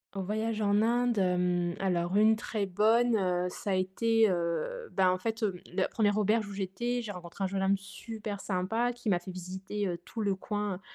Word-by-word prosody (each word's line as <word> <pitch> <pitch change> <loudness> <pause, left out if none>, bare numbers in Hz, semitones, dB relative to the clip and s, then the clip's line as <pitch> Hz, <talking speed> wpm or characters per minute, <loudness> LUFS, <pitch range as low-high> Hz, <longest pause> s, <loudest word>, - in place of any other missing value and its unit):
En 195 - -2
voyage 220 +3 -1
en 205 0 +3
Inde, 240 0 +2
hem, 180 -2 +1
alors 180 -1 0
une 220 +1 +6
très 215 -2 -3
bonne, 225 +5 +3
heu, 180 -2 +1
ça 200 +2 -4
a - - +2
été, 220 +4 +2
heu 185 - -2
ben 185 -1 +4
en 185 - +2
fait, 225 +4 -3
hem, 190 -4 0
la 185 0 +1
1re 210 -1 +1
auberge 215 +1 +2
où 200 - -7
j'étais, 235 +6 -2
j'ai 220 -3 -5
rencontré 180 0 -7
un - - +2
jeune 195 0 -2
homme 195 +1 +3
super 210 +1 -7
sympa 215 +6 0
qui 240 -3 -4
m'a 180 - +4
fait 180 +2 -7
visiter, 190 +3 -4
heu, 175 -2 -2
tout 225 - -5
le 200 -2 +1
coin. 205 -1 -3
200 Hz, 210 wpm, -30 LUFS, 185-220 Hz, -, une